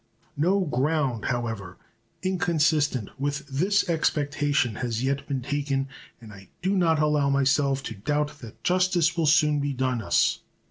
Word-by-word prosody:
No 185 Hz, +7 st, +2 dB
ground, 140 Hz, -5 st, 0 dB
however, 115 Hz, -7 st, -3 dB, 0.5 s
inconsistent 155 Hz, -, +1 dB
with 145 Hz, +1 st, -2 dB
this 180 Hz, +9 st, +1 dB
expectation 145 Hz, -6 st, 0 dB
has 120 Hz, -1 st, -2 dB
yet 140 Hz, +1 st, -1 dB
been 135 Hz, -3 st, -3 dB
taken, 140 Hz, -1 st, -2 dB, 0.3 s
and 110 Hz, -3 st, -12 dB
I 95 Hz, -2 st, -14 dB
do 190 Hz, +2 st, +1 dB
not 165 Hz, -4 st, +3 dB
allow 150 Hz, -2 st, +2 dB
myself 140 Hz, 0 st, +2 dB
to -, -, -5 dB
doubt 145 Hz, +8 st, -2 dB
that 115 Hz, -5 st, -12 dB
justice 180 Hz, -2 st, +2 dB
will 165 Hz, -3 st, +1 dB
soon 150 Hz, -1 st, +4 dB
be 140 Hz, 0 st, -1 dB
done 130 Hz, -2 st, -1 dB
us. -, -, +2 dB
145 Hz, 145 wpm, -26 LUFS, 130-155 Hz, 0.5 s, soon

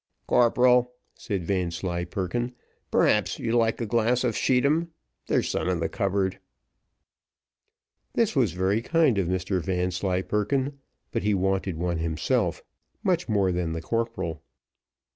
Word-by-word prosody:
"Corporal," 125 Hz, +1 st, +4 dB, 0.2 s
said 100 Hz, -5 st, -4 dB
Vanslyperken, 90 Hz, +5 st, -2 dB, 0.3 s
"perhaps -, -, +2 dB
you'll 120 Hz, +1 st, +1 dB
like 110 Hz, -1 st, +1 dB
a 115 Hz, -, -1 dB
glass 120 Hz, +3 st, +1 dB
of 120 Hz, -4 st, 0 dB
scheedam; 140 Hz, +6 st, +2 dB, 0.4 s
there's -, -, +1 dB
some -, -, -1 dB
in -, -, 0 dB
the -, -, -1 dB
cupboard." 95 Hz, -1 st, -1 dB, 1.7 s
This 230 Hz, -7 st, +1 dB
was 120 Hz, -, +2 dB
very 95 Hz, +4 st, +1 dB
kind 150 Hz, -5 st, +3 dB
of 90 Hz, -, 0 dB
Mr 95 Hz, +1 st, -1 dB
Vanslyperken, 95 Hz, +9 st, -1 dB, 0.3 s
but -, -, -1 dB
he 105 Hz, +1 st, +1 dB
wanted 95 Hz, -2 st, 0 dB
one 85 Hz, 0 st, -1 dB
himself, 80 Hz, -1 st, 0 dB, 0.4 s
much 180 Hz, -6 st, +1 dB
more 100 Hz, -3 st, +2 dB
than 85 Hz, -2 st, -1 dB
the 80 Hz, -, -4 dB
corporal. 115 Hz, -9 st, -2 dB
100 Hz, 125 wpm, -26 LUFS, 90-120 Hz, 1.7 s, Corporal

